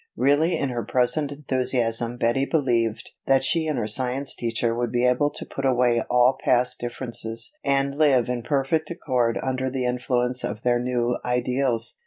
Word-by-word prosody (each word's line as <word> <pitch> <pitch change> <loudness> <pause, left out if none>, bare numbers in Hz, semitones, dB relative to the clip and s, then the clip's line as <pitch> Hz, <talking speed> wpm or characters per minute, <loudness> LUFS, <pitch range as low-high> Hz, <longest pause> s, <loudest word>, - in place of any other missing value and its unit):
Really 145 +7 +2
in 140 - -1
her 120 -2 -3
present 130 +6 0
enthusiasm 125 -4 0
Betty 120 +3 +1
believed 120 -8 0 0.2
that 135 -1 +4
she 160 +3 +1
and 155 - -1
her - - -1
science 130 +5 -2
teacher 115 0 -1
would 120 0 -2
be 120 0 +1
able 125 +4 +2
to - - -6
put 135 - -6
away 125 -3 +2
all 125 +1 +3
past 125 0 +2
differences 115 -2 -4
and 140 0 +1
live 135 -6 +4
in 125 -1 -2
perfect 150 +4 0
accord 125 -9 -1
under 130 0 -1
the 130 -1 -2
influence 125 0 -1
of 105 +2 -4
their 120 -1 +2
new 120 -1 -1
ideals. 125 -1 0
125 Hz, 170 wpm, -24 LUFS, 120-135 Hz, 0.2 s, that